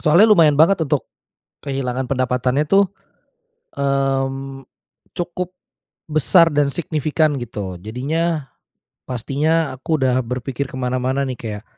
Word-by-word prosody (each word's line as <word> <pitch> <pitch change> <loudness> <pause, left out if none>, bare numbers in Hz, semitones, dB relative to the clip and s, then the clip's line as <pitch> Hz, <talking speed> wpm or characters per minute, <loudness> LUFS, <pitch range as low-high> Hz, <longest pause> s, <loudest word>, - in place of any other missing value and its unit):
soalnya 175 +8 +5
lumayan 160 -8 +6
banget 160 +1 +4
untuk 145 -1 0 0.6
kehilangan 130 -2 -2
pendapatannya 130 +2 +1
tuh, 195 +5 +3 0.9
mmm, 135 -1 -1 0.5
cukup 175 +1 -3 0.6
besar 155 +3 +4
dan 145 -1 +2
signifikan 155 -1 0
gitu. 105 -7 -5
Jadinya, 145 - -2 0.6
pastinya 145 +6 0
aku 155 +5 -1
udah 130 0 +3
berpikir 125 +2 -4
ke 130 - -9
mana-mana 130 +1 -1
nih, 130 -3 -4
kayak 105 -2 -6
135 Hz, 110 wpm, -20 LUFS, 125-155 Hz, 0.9 s, lumayan